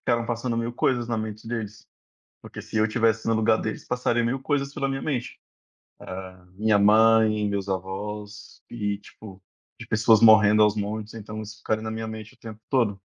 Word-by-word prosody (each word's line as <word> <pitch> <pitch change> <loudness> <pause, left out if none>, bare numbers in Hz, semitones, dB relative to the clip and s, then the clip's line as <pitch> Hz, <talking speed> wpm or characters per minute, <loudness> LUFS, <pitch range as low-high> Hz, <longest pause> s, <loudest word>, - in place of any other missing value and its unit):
ficaram 120 0 0
passando 120 0 -2
1000 115 +1 -2
coisas 120 -1 0
na 115 - -1
mente 110 0 -6
deles. 110 -2 -5 0.6
Porque, - - -9
se 110 - -5
eu 110 - +4
estivesse 115 0 +1
no 115 - +3
lugar 110 0 +3
deles, 110 - -5
passaria 120 -1 0
1000 130 +3 -1
coisas 140 0 -1
pela 135 - -2
minha 135 0 -3
mente. 130 -5 -3 1.0
Ah, 90 -1 -20
minha 105 +2 +2
mãe, 110 0 +4
meus 100 -1 -3
avós. 105 +3 -6
E, 105 -3 -3
tipo, 100 -2 -13 0.4
de - - -9
pessoas 110 0 +4
morrendo 110 -1 +7
aos 105 0 +4
montes. 105 +1 -4
Então 110 0 -7
isso 105 0 -10
ficaria 110 +1 -2
na 110 - -4
minha 110 0 -4
mente 110 -1 -8
o - - -31
tempo 110 -1 -10
todo. 115 -7 +1
110 Hz, 185 wpm, -25 LUFS, 105-115 Hz, 1.0 s, morrendo